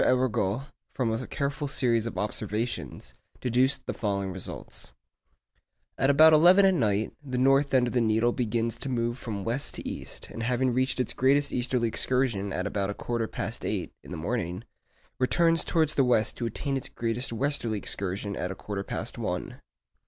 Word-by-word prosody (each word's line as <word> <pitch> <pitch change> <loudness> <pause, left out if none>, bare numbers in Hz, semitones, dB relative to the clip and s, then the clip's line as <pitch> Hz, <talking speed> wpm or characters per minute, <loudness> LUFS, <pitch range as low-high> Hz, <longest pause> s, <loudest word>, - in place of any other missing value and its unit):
Arago, 125 -3 +1 0.3
from 125 -4 0
a 115 +3 -3
careful 140 0 -2
series 120 -5 +1
of - - -6
observations, 105 - -3 0.3
deduced 130 +2 +1
the - - -3
following 100 -3 -2
results:— 90 -8 -7 1.0
At 135 - +2
about 155 +3 +7
eleven 180 +6 +7
at 190 - +5
night, 110 - +1
the 130 -3 -4
north 135 +2 +4
end 130 -2 +4
of 120 - -3
the 125 - +2
needle 110 +1 +3
begins 115 -1 -1
to 135 - -5
move 120 -1 -1
from 105 -4 -4
west 120 +6 -1
to - - -6
east, - - -5
and - - -6
having 125 +2 +1
reached 130 +1 0
its 125 - 0
greatest 140 +2 +2
easterly 125 -1 0
excursion 115 -4 +1
at 95 +1 -2
about 100 -1 -1
a 100 - -3
quarter 115 -2 -2
past - - -5
eight - - -2
in - - -14
the 90 - -5
morning, 90 +1 -3 0.6
returns 165 +5 +3
towards 160 -3 +1
the 135 - +3
west 120 -4 +2
to 120 - -1
attain 135 +5 -2
its 130 - -4
greatest 115 +2 -2
westerly 120 -3 -1
excursion 100 +1 -3
at 90 - -3
a 95 - -5
quarter 100 0 -5
past - - -5
one. - - -4
120 Hz, 180 wpm, -28 LUFS, 105-135 Hz, 1.0 s, about